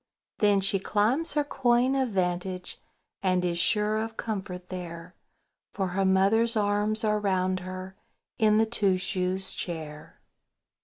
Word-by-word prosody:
Then 205 -2 +3
she 195 0 +3
climbs 220 - +1
her 295 - +1
coign 250 -2 +1
of 265 -2 0
vantage, 180 -1 -2 0.4
And 185 -2 +1
is 170 -1 -1
sure 210 +3 +3
of 225 +1 -4
comfort 190 -5 -5
there, 175 -1 -7 0.6
For 190 -2 -2
her 190 +2 0
mother's 215 +5 +3
arms 210 +1 +1
are 210 -1 +1
round 185 -2 0
her 185 +1 -8 0.4
In 215 -1 +4
the 220 - +4
Two 205 -4 +1
shoes 185 0 -1
Chair. 155 -3 -6
195 Hz, 140 wpm, -27 LUFS, 185-215 Hz, 0.6 s, In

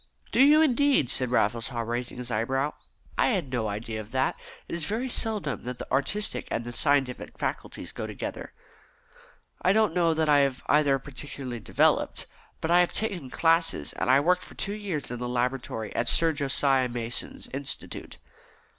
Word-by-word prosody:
"Do - - +4
you, 300 +3 +7
indeed?" 280 - +3
said 130 -2 +2
Raffles 115 -1 +1
Haw, 120 -3 -3
raising 120 +2 -3
his 125 -1 -5
eyebrows. 135 +6 0 0.5
"I - - +5
had 185 - -1
no 120 -4 -1
idea 110 +1 -4
of 105 - -12
that; 130 +2 0 0.3
it - - -7
is 170 -2 -2
very 225 +8 -2
seldom 215 - -1
that 125 0 -5
the - - -8
artistic 170 +11 0
and 115 - -2
the 120 - -6
scientific 140 -2 0
faculties - - -4
go - - -5
together." - - -6 1.1
"I 185 - +4
don't 215 -4 +3
know 170 -2 +2
that 160 0 +1
I 145 -1 +6
have 135 -2 +1
either 145 -2 +4
particularly 135 -2 -6
developed. - - +1 0.4
But 160 - -1
I 175 - +6
have 180 - +2
taken 190 - -2
classes, 165 +3 +1
and - - -2
I 130 +1 +6
worked 180 +4 +2
for - - -13
two 200 - -2
years 190 - -4
in 125 - -4
the 125 0 -3
laboratory 120 -3 -2
at 120 - +3
Sir 165 -1 +5
Josiah 135 -2 +2
Mason's 120 -1 -4
Institute." 135 +1 -6
140 Hz, 180 wpm, -27 LUFS, 125-170 Hz, 1.1 s, you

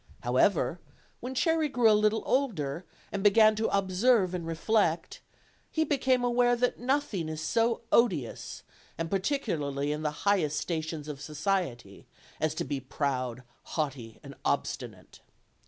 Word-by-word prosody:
However, - - +2 0.4
when 255 +2 -6
Cherry 325 +1 +2
grew 245 -4 +3
a - - +6
little 215 +1 +2
older, 180 - -1 0.3
and 200 - -3
began 215 +2 +6
to 220 - +1
observe 195 +1 +2
and 170 -2 -4
reflect, 165 0 0 0.5
be 315 - +3
became 260 -4 +1
aware 245 0 +3
that 250 +1 0
nothing 245 - -1
is 155 -1 -5
so 230 +8 +1
odious, 175 - +1 0.3
and 165 0 -3
par 195 - +2
ticularly 150 - -1
in 150 - -4
the 150 +3 -4
highest 170 -7 +2
stations 160 -2 -4
of 145 -2 -6
society, 150 - -3 0.3
as 155 -1 0
to - - -2
be 140 -2 -3
proud, 130 -2 -3 0.3
haughty 130 -7 -3
and - - -9
obstinate. - - -3
185 Hz, 140 wpm, -29 LUFS, 150-235 Hz, 0.5 s, a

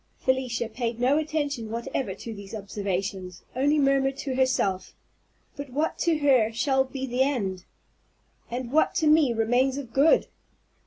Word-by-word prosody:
Felicia 255 -3 -1
paid 235 0 -4
no 265 +5 +3
attention 290 -7 -2
whatever 230 -2 -3
to 230 - -7
these 200 +1 -9
observations, 195 -3 -4
only 285 +4 +2
murmured 275 -1 +2
to 280 -2 -3
herself, 255 -8 0 0.6
"But 285 -1 -7
what 300 +5 -2
to 330 -2 +2
her 260 -7 +3
shall 265 +3 +2
be 265 0 -5
the 250 0 -1
end? 200 -10 -1 0.8
And 245 0 -4
what 310 +3 +2
to 315 - +1
me 305 -4 +5
remains 245 +4 +1
of 250 -5 -7
good? 285 +4 +4
255 Hz, 150 wpm, -26 LUFS, 225-280 Hz, 0.8 s, me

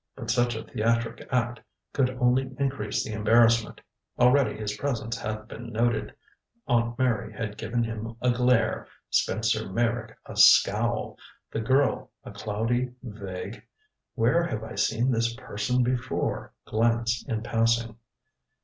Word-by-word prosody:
But - - -3
such 120 -1 +2
a 110 - -5
theatric 115 0 -1
act 120 -1 0 0.3
could 135 -2 +2
only 130 +1 +2
increase 135 -7 -1
the 110 - -5
embarrassment. 115 +1 +3 0.4
Already 125 -1 +4
his 105 -1 -3
presence 115 -5 -2
had 110 -1 -5
been 115 +1 -8
noted 115 0 0 0.5
Aunt 120 -2 +1
Mary 120 -5 0
had 110 -1 -5
given 120 +2 -1
him 115 0 -5
a 125 0 +2
glare, 125 -2 +2 0.2
Spencer 110 -1 +1
Meyrick 115 +1 -1
a - - -9
scowl, - - +4 0.3
the 110 - -2
girl 135 +5 +2
a - - -9
cloudy 120 +4 -2
vague 100 -2 -7 0.5
"where 125 +8 +3
have 110 -10 -3
I 110 - -7
seen 120 +4 +1
this 115 0 0
person 125 +1 -1
before?" 125 0 -2
glance 115 +1 +1
in 110 -4 -2
passing. 115 0 +1
115 Hz, 135 wpm, -27 LUFS, 110-125 Hz, 0.5 s, Already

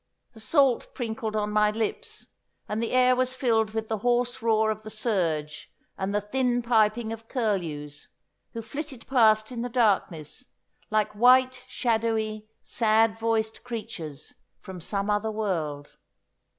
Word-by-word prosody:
The 225 - -13
salt 265 +2 +2
prinkled 220 -2 -3
on 210 0 -1
my 210 0 +4
lips, 220 0 -4 0.4
and 215 +2 -2
the 230 - -2
air 255 0 +4
was 255 0 0
filled 225 -4 +1
with 220 0 -2
the 220 -1 -2
hoarse 245 +2 +1
roar 220 -1 +2
of 215 0 -5
the 215 - -9
surge 175 -9 -2 0.2
and 190 +1 -3
the 205 - +1
thin 245 +3 0
piping 225 -1 +2
of 225 0 -10
curlews, 165 - -3 0.5
who 230 - -5
flitted 275 0 -7
past 220 -3 +4
in 240 -2 -4
the 245 - -3
darkness 205 - 0 0.4
like 215 -1 +1
white, 255 +3 +4
shadowy, 220 -3 -1 0.2
sad 225 -1 +2
voiced 225 -1 -1
creatures 170 - -7 0.3
from 185 -2 -9
some 200 +3 -2
other 210 +1 0
world. 165 -10 -3
220 Hz, 145 wpm, -26 LUFS, 210-240 Hz, 0.5 s, my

